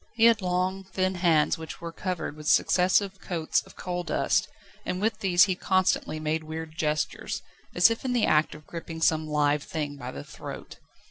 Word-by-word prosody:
He 225 0 +4
had 230 -2 +5
long, 185 +1 -1
thin 185 0 -1
hands, 165 -4 +2
which 160 - -8
were 170 0 -6
covered 180 -3 -4
with 150 0 -9
successive 185 +3 +3
coats 165 -4 0
of - - -16
coal 180 -1 -4
dust, 165 - +1 0.4
and 180 - -3
with 220 +2 0
these 180 -2 +5
he 190 - +2
constantly 185 -4 +1
made 155 +1 -1
weird 160 0 -7
gestures, 155 -2 -2 0.3
as 175 +6 +6
if 230 - -3
in 255 -2 -1
the 240 -3 +3
act 155 0 +2
of 150 0 -13
gripping 165 -1 -7
some 160 -1 +2
live 150 -1 +2
thing 145 -1 -4
by - - -6
the 70 +1 -7
throat. - - -9
175 Hz, 190 wpm, -27 LUFS, 155-185 Hz, 0.4 s, as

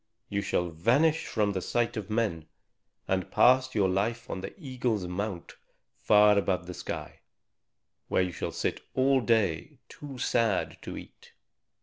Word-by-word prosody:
You 100 -1 -1
shall 90 -3 -1
vanish 125 - +2
from 105 -2 +1
the 95 -2 -2
sight 120 +5 0
of 110 -3 -5
men, 105 -8 -1 0.6
and 95 -2 -1
pass 130 0 +4
your 100 -3 +3
life 115 +6 -1
on 95 - -4
the 95 - -8
eagle's 125 - -2
mount 90 0 -4 0.5
far 105 -1 +6
above 90 -2 -1
the 90 - -7
sky, - - -6 0.9
where 95 - +2
you 90 - -2
shall - - -4
sit - - -2
all 130 0 +3
day, 110 -9 0
too 140 -3 -9
sad 115 -5 0
to - - -7
eat. - - -13
105 Hz, 150 wpm, -28 LUFS, 95-120 Hz, 0.9 s, far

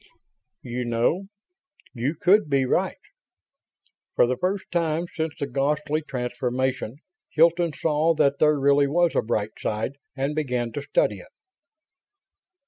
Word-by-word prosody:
"You 125 0 -3
know... 120 +11 0 0.7
you 135 +5 -2
could 190 -3 +4
be 135 -2 +2
right?" - - 0 1.2
For - - +5
the 125 +1 0
first 185 +8 -2
time 170 -1 0
since 160 -2 -3
the - - -2
"ghastly" 145 +3 0
transformation 125 -2 -2 0.3
Hilton 170 +1 +3
saw 160 +2 +1
that 140 -2 +2
there 150 -1 +4
really 140 +1 +4
was 170 +3 +2
a - - +3
bright 110 -1 -1
side 110 +6 -3 0.2
and 135 +2 -1
began 125 -6 -1
to 145 - -4
study 140 -8 +1
it. - - -14
140 Hz, 135 wpm, -25 LUFS, 125-160 Hz, 1.2 s, For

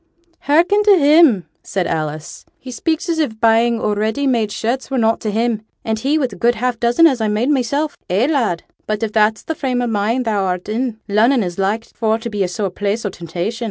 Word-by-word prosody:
'Hearken 345 +8 +3
to 410 -2 +5
him!' 290 - +5 0.2
said 190 -3 -2
Alice. 155 -1 -4
'He 260 - -10
speaks 320 +8 -2
as 330 -2 -1
if 225 -8 -2
buying 230 +1 +3
o' 210 - 0
ready 220 +7 -1
made 230 -6 +1
shirts 240 +5 -3
were 270 - -1
nought 225 -1 +2
to 215 - -2
him, 225 +1 0 0.2
and 220 -1 -1
he 280 +6 +1
wi' 290 - +1
a - - -9
good 235 +5 +2
half 240 +1 -2
dozen 240 +7 +4
as 265 -7 +3
I 220 - +1
made 215 +5 0
mysel'. 285 +3 0 0.2
Eh, 195 +7 +2
lad? 245 - 0 0.2
but 215 0 -2
if 215 -1 -2
that's 215 0 +2
the 320 - -3
frame 260 -5 -2
o' 245 - 0
mind 225 +3 0
thou'rt 190 -5 -1
in, 230 +1 -2
Lunnon 225 +4 +3
is 175 0 -5
like 210 +4 0
for 220 -1 -1
to 230 0 -6
be 205 -2 -1
a - - 0
sore 190 +2 -3
place 205 +4 -2
o' - - 0
temptation. 175 +7 -5
225 Hz, 225 wpm, -18 LUFS, 210-260 Hz, 0.2 s, to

